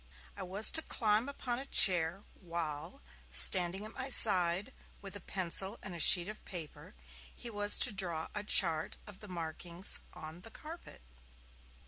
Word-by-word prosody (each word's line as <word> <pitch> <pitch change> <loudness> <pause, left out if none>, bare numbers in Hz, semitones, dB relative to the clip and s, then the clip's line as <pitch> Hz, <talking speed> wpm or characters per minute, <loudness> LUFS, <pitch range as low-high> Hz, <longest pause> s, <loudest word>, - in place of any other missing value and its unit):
I - - -10
was 190 +4 +3
to 320 - +4
climb 220 -2 -1
upon 250 -3 -5
a 270 - -7
chair, 175 0 +4
while, 165 - -7 0.3
standing 180 - +2
at 215 - -11
my 260 +1 -6
side, 185 -6 +2 0.3
with 200 0 -9
a - - -6
pencil 190 +3 -2
and 190 - -7
a 170 - -9
sheet 175 +3 +5
of 215 +1 -10
paper, 165 - -8 0.4
he 235 - -6
was 205 -1 +2
to 245 - +3
draw 175 -5 -3
a 210 - -3
chart 165 -6 +3
of 205 -3 -13
the 210 - -11
markings 170 +1 -3
on 155 +3 -11
the 225 - -10
carpet. 310 - -12
190 Hz, 160 wpm, -32 LUFS, 170-210 Hz, 0.4 s, sheet